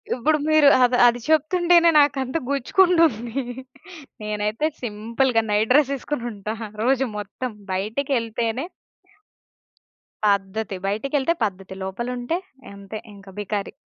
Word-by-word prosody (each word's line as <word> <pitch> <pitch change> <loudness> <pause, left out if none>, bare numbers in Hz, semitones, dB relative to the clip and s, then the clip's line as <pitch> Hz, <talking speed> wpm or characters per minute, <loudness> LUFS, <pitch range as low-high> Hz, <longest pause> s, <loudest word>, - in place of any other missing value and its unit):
ఇప్పుడు 300 +5 +2
మీరు 310 -2 +5 0.2
అది 245 0 +3
అది 240 0 +2
చెప్తుంటేనే 340 +2 +4
నాకంత 270 -2 +1
గుచ్చుకుంటుంది. 280 - +2 0.9
నేనైతే 210 +5 -1 0.2
సింపుల్‌గా 230 +2 0
నైట్ 210 +3 +1
డ్రెస్ 280 0 +4
ఏసుకొని 270 -1 -4
ఉంటా, 210 +1 -5 0.3
రోజు 265 +2 +2
మొత్తం. 210 +5 -5 0.2
బయటికెళ్తేనే 230 +3 -1 1.6
పద్ధతి. 200 +1 0
బయటికెళ్తే 270 +9 0
పద్ధతి. 195 -2 -4
లోపలుంటే, 245 - -3 0.4
అంతే 200 +2 -8
ఇంక 200 -1 -14
బికారి. 205 0 -3
240 Hz, 100 wpm, -23 LUFS, 210-280 Hz, 1.6 s, మీరు